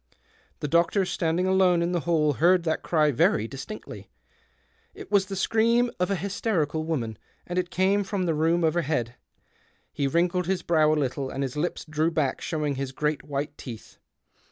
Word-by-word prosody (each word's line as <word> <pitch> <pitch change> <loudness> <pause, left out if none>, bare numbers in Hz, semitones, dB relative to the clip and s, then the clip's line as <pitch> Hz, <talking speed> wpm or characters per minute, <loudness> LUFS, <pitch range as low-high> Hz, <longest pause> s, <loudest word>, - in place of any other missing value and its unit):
The 150 - -1
doctor 170 +5 +2
standing 170 0 0
alone 185 -2 +3
in 170 - -1
the 175 - +1
hall 155 -2 +1
heard 175 +5 +3
that 160 -1 -1
cry 155 -3 +2
very 115 -3 +2
distinctly; 140 - -9 0.9
it 405 -1 -11
was 195 -1 +3
the 195 - -5
scream 230 +4 +2
of 180 - +1
a 200 - +1
hysterical 175 -5 -1
woman, 120 -10 -3 0.3
and 180 +1 -2
it 175 -1 -2
came 195 +3 +2
from 195 -2 -2
the 165 - +1
room 165 +3 +1
overhead. 155 -7 0 0.8
He 140 - 0
wrinkled 175 +4 +1
his 190 -1 -1
brow 155 -2 +3
a - - +3
little, 135 -1 -2
and 135 +1 -3
his 130 0 -4
lips 160 +4 -2
drew 155 +1 +1
back 155 -5 -1
showing 150 -3 -2
his 135 -1 -3
great 150 +2 -1
white 145 0 -4
teeth. 115 -5 -10
165 Hz, 180 wpm, -26 LUFS, 150-185 Hz, 0.9 s, alone